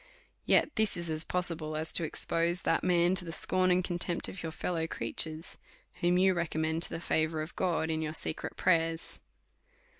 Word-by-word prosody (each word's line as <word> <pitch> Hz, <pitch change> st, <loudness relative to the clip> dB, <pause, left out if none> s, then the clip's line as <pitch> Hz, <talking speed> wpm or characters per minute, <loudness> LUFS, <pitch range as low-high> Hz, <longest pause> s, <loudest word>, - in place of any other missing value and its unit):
Yet 305 Hz, -, +2 dB
this 220 Hz, -3 st, +3 dB
is 170 Hz, -1 st, -1 dB
as 155 Hz, 0 st, +2 dB
possible, 165 Hz, -4 st, -1 dB
as 160 Hz, +1 st, -4 dB
to 170 Hz, -, +8 dB
expose 170 Hz, +2 st, 0 dB
that -, -, +1 dB
man 175 Hz, 0 st, +3 dB
to 185 Hz, -1 st, -2 dB
the 165 Hz, -, -6 dB
scorn 185 Hz, +3 st, 0 dB
and 180 Hz, 0 st, +3 dB
contempt 175 Hz, -1 st, -2 dB
of 185 Hz, -, -7 dB
your 165 Hz, -, -4 dB
fellow 165 Hz, 0 st, -2 dB
creatures, 160 Hz, 0 st, -1 dB, 0.4 s
whom 175 Hz, +1 st, +3 dB
you 190 Hz, +1 st, +4 dB
recom 170 Hz, -2 st, -2 dB
mend 160 Hz, +1 st, -1 dB
to -, -, +1 dB
the 165 Hz, -, -5 dB
favour 160 Hz, -1 st, 0 dB
of 155 Hz, -, -10 dB
God 165 Hz, -3 st, 0 dB
in 160 Hz, 0 st, -1 dB
your 155 Hz, 0 st, -3 dB
secret 160 Hz, -, -4 dB
prayers. 165 Hz, -2 st, 0 dB
170 Hz, 190 wpm, -30 LUFS, 160-180 Hz, 0.4 s, to